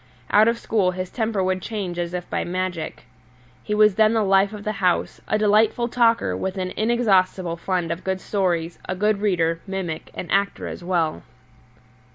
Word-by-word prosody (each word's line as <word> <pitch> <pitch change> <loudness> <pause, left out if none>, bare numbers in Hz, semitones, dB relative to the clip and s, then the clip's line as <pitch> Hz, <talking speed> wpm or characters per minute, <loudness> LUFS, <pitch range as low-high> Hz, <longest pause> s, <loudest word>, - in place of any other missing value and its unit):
Out 215 +2 +6
of 230 0 +2
school 210 -5 +1
his 185 0 -5
temper 220 -4 -1
would 185 0 0
change 190 -4 -4
as 175 0 -3
by - - -2
magic. 180 -2 -4 0.6
He 210 - -2
was 210 -1 +5
then 215 +2 +4
the 220 -1 +2
life 195 0 +3
of 210 -1 -8
the 215 - -1
house, 180 -1 0
a - - +1
delightful 215 +3 +3
talker 230 - +2
with 190 - -3
an 185 -1 -2
inexhaustible 195 -6 +2
fund 175 -1 -2
of 170 +2 -4
good 190 0 -1
stories, 175 -5 -1
a 185 - -1
good 210 +1 +1
reader, 170 -5 +1
mimic, 190 -5 -4
and 180 - -5
actor 200 +1 +1
as - - -7
well. 170 -3 0
190 Hz, 180 wpm, -23 LUFS, 180-215 Hz, 0.6 s, Out